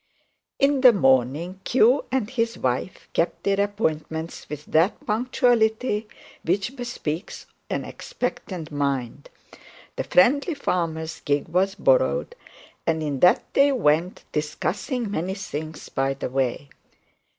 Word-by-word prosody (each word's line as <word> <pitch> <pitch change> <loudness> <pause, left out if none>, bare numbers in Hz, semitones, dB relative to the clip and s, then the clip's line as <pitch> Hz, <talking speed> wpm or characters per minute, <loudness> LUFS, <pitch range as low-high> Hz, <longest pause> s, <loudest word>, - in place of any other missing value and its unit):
In 275 -1 +3
the 250 -2 +8
morning, 140 - +2
Q 255 +2 +4
and 260 -5 0
his 230 -1 -1
wife 130 +8 -2
kept 170 - 0
their 200 0 +2
appointments 160 -5 -3
with 150 0 -7
that 165 +6 +1
punctuality 220 -1 +1 0.4
which 195 - -1
bespeaks 205 - -5 0.2
an - - -2
expectant 240 - -5
mind. 140 -2 -2 0.7
The - - -1
friendly 280 - +3
farmer's 165 - -2
gig 145 0 -1
was 190 +3 +1
borrowed, - - +2 0.5
and 160 -1 +1
in 145 -3 -2
that 180 - +5
they 280 +1 +5
went, 175 - +1
discussing 205 - -2
many 190 +1 -2
things 155 -6 -6
by 135 0 0
the 135 - -4
way. 135 +1 -1
185 Hz, 120 wpm, -24 LUFS, 150-240 Hz, 0.7 s, the